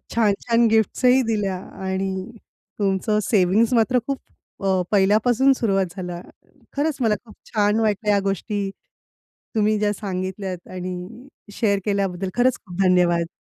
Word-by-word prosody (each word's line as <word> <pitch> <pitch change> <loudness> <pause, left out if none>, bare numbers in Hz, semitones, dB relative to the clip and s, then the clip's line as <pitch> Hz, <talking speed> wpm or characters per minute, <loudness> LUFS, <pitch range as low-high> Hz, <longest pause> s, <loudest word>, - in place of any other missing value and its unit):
छान-छान 230 +2 +2
गिफ्ट्स 220 +2 +1
ही 250 +1 +6
दिल्या 200 -4 -1 0.3
आणि 190 +2 -3 0.5
तुमचं 200 +2 +1
सेव्हिंग्ज 210 +3 +3
मात्र 245 +2 +3
खूप 275 -1 -2 0.4
अ, 190 -1 +2
पहिल्यापासून 220 +6 +4
सुरुवात 195 -7 0
झालं. 180 -2 -5 0.5
खरंच 290 +1 0
मला 220 -3 +3
खूप 215 - -15 0.2
छान 210 0 +2
वाटलं 210 -1 0
या 200 - +3
गोष्टी 200 +1 -2 0.9
तुम्ही 215 0 +2
ज्या 210 0 +1
सांगितल्यात 190 -2 -5
आणि 185 +7 -7 0.3
शेअर 200 -2 +1
केल्याबद्दल 195 -2 -1
खरंच 250 +1 +3
खूप 180 -1 -4
धन्यवाद. 175 -2 +3
205 Hz, 130 wpm, -22 LUFS, 190-225 Hz, 0.9 s, ही